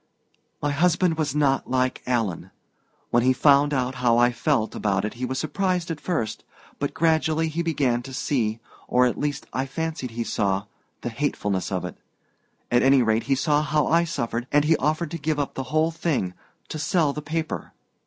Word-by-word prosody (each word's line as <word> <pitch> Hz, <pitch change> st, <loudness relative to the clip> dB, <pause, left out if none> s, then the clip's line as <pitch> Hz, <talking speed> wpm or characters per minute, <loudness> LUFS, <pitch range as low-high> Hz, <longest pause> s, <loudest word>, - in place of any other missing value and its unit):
"My 145 Hz, -, +1 dB
husband 175 Hz, +3 st, +2 dB
was 150 Hz, -3 st, -1 dB
not 140 Hz, -2 st, +2 dB
like 130 Hz, 0 st, 0 dB
Alan. 115 Hz, -8 st, -1 dB, 0.6 s
When 120 Hz, -, +4 dB
he 130 Hz, +2 st, +4 dB
found 145 Hz, +2 st, +4 dB
out 130 Hz, -2 st, 0 dB
how 120 Hz, -2 st, +4 dB
I 120 Hz, +1 st, +5 dB
felt 120 Hz, -2 st, 0 dB
about 100 Hz, -1 st, 0 dB
it 105 Hz, -, -4 dB
he 125 Hz, +2 st, -4 dB
was 130 Hz, +1 st, -3 dB
surprised 180 Hz, +2 st, -1 dB
at 160 Hz, -, -5 dB
first 115 Hz, -, -2 dB, 0.4 s
but 145 Hz, -, -2 dB
gradually 160 Hz, 0 st, +2 dB
he 160 Hz, +2 st, -2 dB
began 140 Hz, -8 st, +1 dB
to 135 Hz, +2 st, -9 dB
see 115 Hz, -6 st, 0 dB, 0.3 s
or 125 Hz, 0 st, +4 dB
at 125 Hz, -, 0 dB
least 145 Hz, -1 st, -2 dB
I 130 Hz, +1 st, -1 dB
fancied 160 Hz, -2 st, -3 dB
he 115 Hz, +1 st, -3 dB
saw 100 Hz, -3 st, 0 dB, 0.4 s
the -, -, -3 dB
hatefulness 105 Hz, -7 st, -2 dB
of 90 Hz, -2 st, -1 dB
it. 90 Hz, -, -7 dB, 0.7 s
At 120 Hz, 0 st, +4 dB
any 135 Hz, -1 st, +5 dB
rate 110 Hz, 0 st, +1 dB
he 135 Hz, -, +2 dB
saw 150 Hz, +2 st, +2 dB
how 150 Hz, -1 st, +1 dB
I 170 Hz, +1 st, +3 dB
suffered, 120 Hz, -7 st, -3 dB
and 145 Hz, 0 st, +4 dB
he 160 Hz, +1 st, +4 dB
offered 155 Hz, +4 st, -1 dB
to 170 Hz, -, -4 dB
give 150 Hz, +1 st, -1 dB
up 145 Hz, -1 st, -2 dB
the -, -, -3 dB
whole 155 Hz, +2 st, +2 dB
thing 150 Hz, -, -1 dB, 0.4 s
to 155 Hz, -, -5 dB
sell 155 Hz, -2 st, +1 dB
the 150 Hz, -, -5 dB
paper. 160 Hz, +1 st, -3 dB
140 Hz, 195 wpm, -24 LUFS, 120-155 Hz, 0.7 s, I